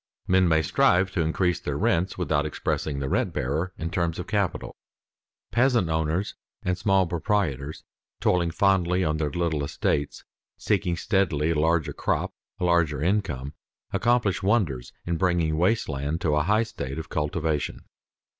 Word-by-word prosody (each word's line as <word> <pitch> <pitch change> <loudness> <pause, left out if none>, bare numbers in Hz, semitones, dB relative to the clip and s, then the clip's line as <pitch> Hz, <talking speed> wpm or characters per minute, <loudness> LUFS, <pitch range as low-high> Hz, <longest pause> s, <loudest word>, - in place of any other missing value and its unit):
_ - - -69 0.2
Men 95 0 +4
may 80 -1 +3
strive 95 +4 +3
to 90 - 0
increase 85 +2 +1
their 70 -1 -3
rents 85 +5 +1
without 80 -5 +1
expressing 75 -1 -2
the 70 -1 -2
rent - - 0
bearer 75 +8 -1
in 85 +1 -4
terms 85 -4 -1
of 90 - -4
capital. 100 -4 -2 0.8
Peasant 120 -7 +3
owners 80 +4 0 0.3
and 90 - 0
small 95 0 +2
proprietors, 80 -5 -1 0.4
toiling 85 -2 +2
fondly 90 0 +2
on 75 -2 0
their 75 -1 -1
little 80 -1 -1
estates, 70 0 -1 0.3
seeking 95 -4 0
steadily 85 -5 +1
a 80 - 0
larger 80 0 +1
crop, - - -1 0.3
a - - -3
larger 85 -5 +2
income, 80 -6 -1 0.4
accomplish 120 -5 +2
wonders 95 - 0
in 85 -1 -1
bringing 85 -3 +1
waste 95 +8 +2
land 70 +2 -2
to 75 -3 +1
a 75 - +3
high 105 +8 +2
state 70 - -6
of 80 0 -6
cultivation. 75 0 -2
85 Hz, 155 wpm, -26 LUFS, 75-95 Hz, 0.8 s, Men